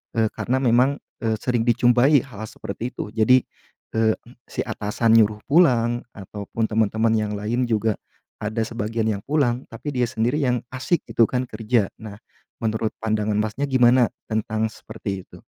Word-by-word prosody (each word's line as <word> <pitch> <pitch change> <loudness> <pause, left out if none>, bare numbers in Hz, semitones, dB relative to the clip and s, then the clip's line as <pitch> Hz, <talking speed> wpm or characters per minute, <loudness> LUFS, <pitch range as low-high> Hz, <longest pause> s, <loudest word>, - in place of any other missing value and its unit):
eee, 110 -1 +3
karena 130 +2 0
memang, 130 +3 +3 0.2
eee, 110 -1 +1
sering 120 -1 0
dijumpai 120 +4 +4
hal-hal 110 -5 -8
seperti 115 +5 -6
itu. - - -5
Jadi, 125 +3 +5 0.5
eee, 110 -1 +3 0.4
si - - -7
atasan 110 +2 +1
nyuruh 105 -2 +4
pulang, 120 -7 +3
ataupun 105 +3 -4
teman-teman 110 +1 +1
yang 105 -1 0
lain 115 +5 0
juga 110 -2 +1 0.4
ada 110 +2 -2
sebagian 115 0 -2
yang 105 -2 -1
pulang, 135 -4 +1
tapi 115 +6 -5
dia 125 -1 +2
sendiri 120 +4 0
yang 125 -4 +1
asyik 130 +7 -1
itu 115 - +4
kan 125 0 -1
kerja. 110 -1 0
Nah, 110 -2 -8 0.5
menurut 110 0 -1
pandangan 105 -1 0
Masnya 110 +7 -1
gimana 125 -1 +5 0.2
tentang 110 0 0
seperti 100 -4 -6
itu? - - -15
115 Hz, 155 wpm, -23 LUFS, 110-125 Hz, 0.5 s, Jadi